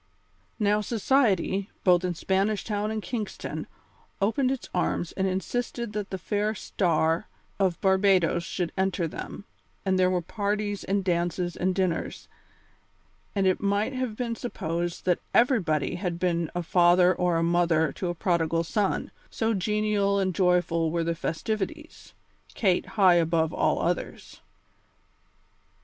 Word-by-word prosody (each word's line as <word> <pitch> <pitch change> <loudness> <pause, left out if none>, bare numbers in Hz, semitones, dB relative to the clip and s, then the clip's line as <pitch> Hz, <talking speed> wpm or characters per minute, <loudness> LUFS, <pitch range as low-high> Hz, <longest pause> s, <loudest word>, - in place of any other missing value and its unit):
Now 210 0 +2
society, 210 -4 +1
both 180 -1 +4
in 180 -1 -1
Spanish 195 +4 0
Town 210 -1 -2
and 215 -1 -3
Kingston, 210 +3 -5 0.5
opened 240 +6 +1
its 265 -1 -3
arms 175 -1 -1
and 190 0 -1
insisted 230 +4 -3
that 210 -1 -3
the 190 - -3
fair 210 +3 -1
star 165 -2 0 0.3
of 185 -3 +1
Barbadoes 190 -3 +3
should 175 -1 -3
enter 190 -2 0
them, 200 - -8 0.4
and 190 -1 +2
there 185 0 +4
were 180 -2 0
parties 205 +1 -2
and 195 0 0
dances 175 0 -1
and 185 0 0
dinners, 185 -4 -2 1.1
and 195 -1 +1
it 185 -1 +2
might 205 +5 0
have 255 -4 -3
been 235 0 -2
supposed 175 -7 -4
that 180 -2 +2 0.2
everybody 200 - +2
had 180 -2 -3
been 170 -2 0
a 175 - -1
father 175 +1 +5
or 180 -2 +1
a 165 - +1
mother 170 -3 +2
to 180 - -4
a 175 - -3
prodigal 165 -2 +1
son, 195 +5 -1 0.2
so 225 0 0
genial 210 0 +1
and 190 -2 0
joyful 175 -3 +2
were 170 +1 0
the 170 0 0
festivities 220 - -4 0.4
Kate 190 -5 +1
high 190 -3 +7
above 160 -1 +1
all - - +1
others. - - -3
190 Hz, 140 wpm, -27 LUFS, 175-210 Hz, 1.1 s, high